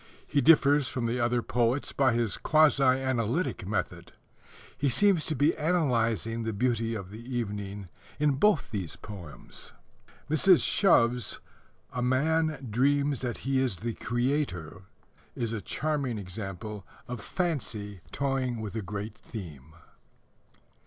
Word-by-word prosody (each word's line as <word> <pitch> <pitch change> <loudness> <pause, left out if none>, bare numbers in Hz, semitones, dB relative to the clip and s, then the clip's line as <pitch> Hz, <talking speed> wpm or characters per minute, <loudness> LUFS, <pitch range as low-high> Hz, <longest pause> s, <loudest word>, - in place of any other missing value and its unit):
He 145 - +1
differs 145 -3 +5
from 125 -2 -2
the 120 +2 -1
other 120 0 +1
poets 120 +3 0
by 130 -3 +3
his 115 -4 0
quasi 155 -2 +4
analytic 130 - +1
method. 105 - -3 0.6
He 140 - +1
seems 175 +6 +3
to 155 - -1
be 145 +5 +3
analyzing 115 - +1
the 110 -1 -2
beauty 115 0 0
of 95 -3 -6
the 110 - -8
evening 105 -5 -4 0.3
in 150 -1 +3
both 210 -3 +3
these 95 -8 -4
poems. 95 -7 -9 0.5
Mrs. 170 +5 +5
Shove's 125 - +3 0.5
A 125 - -2
Man 150 +3 +1
Dreams 140 +4 +2
that 125 -2 -4
He 135 -1 +2
is 130 -8 +1
the 115 +5 -3
Creator 120 - -2 0.5
is 115 -1 -2
a 110 - -3
charming 140 -5 -2
example 100 +1 -6 0.2
of 125 -3 -5
fancy 110 - -3
toying 135 -4 -1
with 105 -3 -5
a 110 - -1
great 105 +2 -5
theme. 80 - -10
120 Hz, 130 wpm, -28 LUFS, 105-140 Hz, 0.6 s, differs